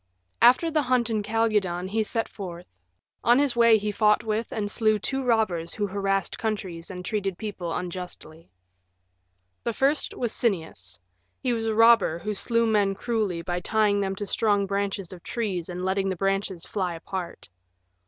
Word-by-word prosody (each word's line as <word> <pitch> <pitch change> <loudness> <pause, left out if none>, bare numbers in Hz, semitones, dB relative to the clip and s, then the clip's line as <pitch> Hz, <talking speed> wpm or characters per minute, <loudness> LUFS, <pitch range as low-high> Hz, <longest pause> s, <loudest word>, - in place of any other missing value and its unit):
After 255 +8 +6
the 310 -1 +2
hunt 250 -3 +1
in 215 -1 +1
Calydon 210 -5 0
he 220 +3 +1
set 225 +1 -1
forth. 180 -3 -8 0.6
On 240 +1 +5
his 280 -3 +2
way 230 -1 +6
he 210 0 -2
fought 210 +1 +3
with 220 +1 -2
and 205 -2 -2
slew 215 -1 +2
two 270 +6 -2
robbers 215 -9 +1
who 205 - 0
harassed 195 0 -1
countries 190 -6 -3
and 180 -1 -7
treated 195 -4 -2
people 195 -6 -5
unjustly. 175 -2 -6 1.1
The 235 - -1
first 275 +5 +1
was 240 -3 -2
Sinnias. 160 - -2 0.4
He 250 - +1
was 225 -1 -2
a 220 - 0
robber 225 -7 +5
who 210 +5 -3
slew 230 +3 +1
men 205 -3 +2
cruelly 205 -6 -1
by 175 +1 -2
tying 210 +1 +2
them 195 -1 -1
to 205 - -4
strong 205 0 +1
branches 195 -2 -2
of 175 - -11
trees 195 -8 -3
and 180 +1 -4
letting 195 +1 0
the 190 - -1
branches 195 -1 -1
fly 185 -4 -2
apart. 175 +1 -6
205 Hz, 170 wpm, -26 LUFS, 185-225 Hz, 1.1 s, After